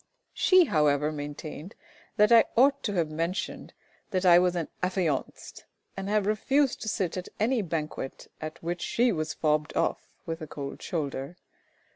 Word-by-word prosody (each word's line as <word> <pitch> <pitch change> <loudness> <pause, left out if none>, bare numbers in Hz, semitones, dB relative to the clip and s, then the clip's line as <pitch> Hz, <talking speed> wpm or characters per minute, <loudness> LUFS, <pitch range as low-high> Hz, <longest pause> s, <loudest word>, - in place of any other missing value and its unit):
She, 370 -2 +5
however, 150 - +2
maintained 150 +3 -7 0.4
that 210 +2 +5
I 230 -1 +8
ought 275 +3 +5
to 205 - -1
have 165 -5 0
mentioned 165 +4 -3 0.4
that 185 -2 -1
I 175 -1 +8
was 180 0 +2
an 170 -3 -2
affianced, 180 -6 -2 0.3
and 195 0 -4
have 210 -1 +2
refused 265 +6 +1
to - - -5
sit 185 -3 -1
at 180 - -5
any 230 +3 +2
banquet 155 -6 -4 0.2
at 155 +2 -7
which 175 +1 -3
she 240 +1 +2
was 155 -4 -2
fobbed 150 -1 0
off - - -1 0.2
with 165 0 -5
a 155 - -6
cold 140 -2 -7
shoulder. 145 0 -4
175 Hz, 160 wpm, -28 LUFS, 155-205 Hz, 0.4 s, I